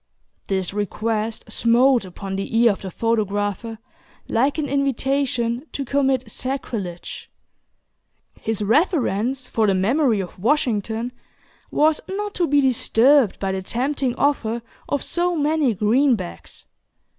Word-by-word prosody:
This 190 -1 -1
request 215 +2 -2
smote 240 0 +3
upon 190 +1 -6
the 195 +3 -2
ear 235 -1 +6
of 195 - -5
the 190 - -5
photographer 210 +1 -1 0.5
like 270 +7 +1
an 305 -2 -1
invitation 270 -2 0
to 275 - -3
commit 265 -3 0
sacrilege. 220 -10 -5 1.1
His 220 -1 -2
reverence 255 - +1
for 220 -1 +1
the 195 - +3
memory 230 +4 +2
of 185 -1 -6
Washington 230 -1 0 0.6
was 305 +1 +2
not 410 +2 -3
to 350 -2 0
be 285 0 +4
disturbed 260 -1 +3
by 195 -1 -2
the 190 0 -2
tempting 255 +4 -1
offer 235 -5 0 0.3
of 285 - -1
so 350 0 0
many 295 -5 +1
greenbacks. 220 - 0
235 Hz, 120 wpm, -22 LUFS, 210-275 Hz, 1.1 s, ear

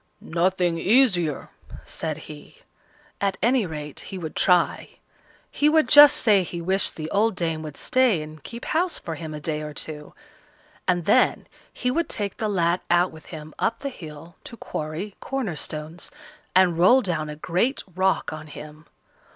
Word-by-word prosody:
"Nothing 175 0 0
easier," 185 - +2 0.4
said 155 -2 -4
he; 150 -1 -12 0.6
at 195 -1 0
any 240 -3 +2
rate 150 -2 -6
he 195 - -7
would 160 -4 -6
try. 180 -2 +2 0.5
He 295 - +3
would 315 -4 +3
just 290 +2 +9
say 210 -4 +4
he 175 -1 -5
wished 190 +3 +1
the 155 -1 -5
old 210 +1 +2
dame 165 -3 -1
would 155 -2 -8
stay 245 -11 +2
and 155 0 -11
keep 235 +1 -8
house 340 +2 0
for 165 - -6
him 160 0 -7
a 150 - -6
day 155 0 -3
or 150 -1 -7
two, 150 -1 -7 0.7
and 175 -2 +1
then 250 +6 +3 0.3
he 250 - -2
would 335 +5 -1
take 205 -2 -3
the 215 - -1
lad 175 -2 +1
out 175 +1 +3
with 160 -2 -14
him 155 -2 -9
up - - -1
the 280 - -3
hill 165 - -11
to 235 - -9
quarry 160 +6 -5
corner 255 -11 -3
stones, 155 +3 -5 0.5
and 180 -3 +4
roll 245 +9 +6
down 160 -5 -2
a 150 - -6
great 180 - -1
rock 190 -3 +1
on 155 0 -8
him. 150 +1 -11
175 Hz, 170 wpm, -24 LUFS, 155-215 Hz, 0.7 s, just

